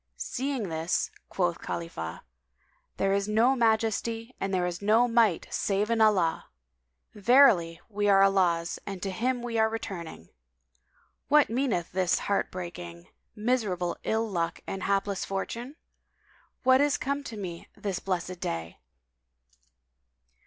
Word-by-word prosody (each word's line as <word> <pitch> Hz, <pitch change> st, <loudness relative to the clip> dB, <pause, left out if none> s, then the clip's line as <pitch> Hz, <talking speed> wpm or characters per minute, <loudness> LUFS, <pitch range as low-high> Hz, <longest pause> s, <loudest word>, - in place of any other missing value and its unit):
Seeing 250 Hz, -, -3 dB
this 160 Hz, +2 st, -1 dB, 0.2 s
quoth 175 Hz, -2 st, 0 dB
Khalifah, 85 Hz, -, -5 dB, 0.7 s
"There 195 Hz, 0 st, +1 dB
is 200 Hz, 0 st, 0 dB
no 230 Hz, +5 st, +3 dB
Majesty 225 Hz, 0 st, 0 dB
and 195 Hz, -, -2 dB
there 180 Hz, -2 st, +1 dB
is 175 Hz, +1 st, -4 dB
no 220 Hz, +4 st, +4 dB
Might 230 Hz, -7 st, +2 dB
save 205 Hz, +2 st, 0 dB
in 230 Hz, -1 st, +2 dB
Allah! 190 Hz, -7 st, +3 dB, 0.7 s
verily, 205 Hz, -7 st, +5 dB
we 205 Hz, -1 st, 0 dB
are 195 Hz, -1 st, +6 dB
Allah's 175 Hz, -4 st, +2 dB
and 195 Hz, -2 st, -5 dB
to 195 Hz, -, -2 dB
Him 245 Hz, +5 st, -1 dB
we 235 Hz, -2 st, -2 dB
are 220 Hz, 0 st, +4 dB
returning! 180 Hz, -, -6 dB, 1.0 s
What 295 Hz, -4 st, +4 dB
meaneth 230 Hz, -9 st, 0 dB
this 185 Hz, -1 st, +2 dB
heart 200 Hz, -, 0 dB
breaking, 175 Hz, -1 st, -8 dB, 0.3 s
miserable 210 Hz, -6 st, 0 dB
ill 225 Hz, +1 st, 0 dB
luck 170 Hz, -4 st, -2 dB
and 190 Hz, -, -5 dB
hapless 200 Hz, 0 st, 0 dB
fortune? 235 Hz, +7 st, -4 dB, 0.9 s
What 260 Hz, +1 st, +5 dB
is 290 Hz, 0 st, +2 dB
come 280 Hz, +1 st, -2 dB
to 225 Hz, -, -7 dB
me 175 Hz, -4 st, -6 dB
this 195 Hz, -3 st, -3 dB
blessed 185 Hz, -1 st, -3 dB
day? 85 Hz, -, -4 dB
200 Hz, 130 wpm, -28 LUFS, 175-230 Hz, 1.0 s, are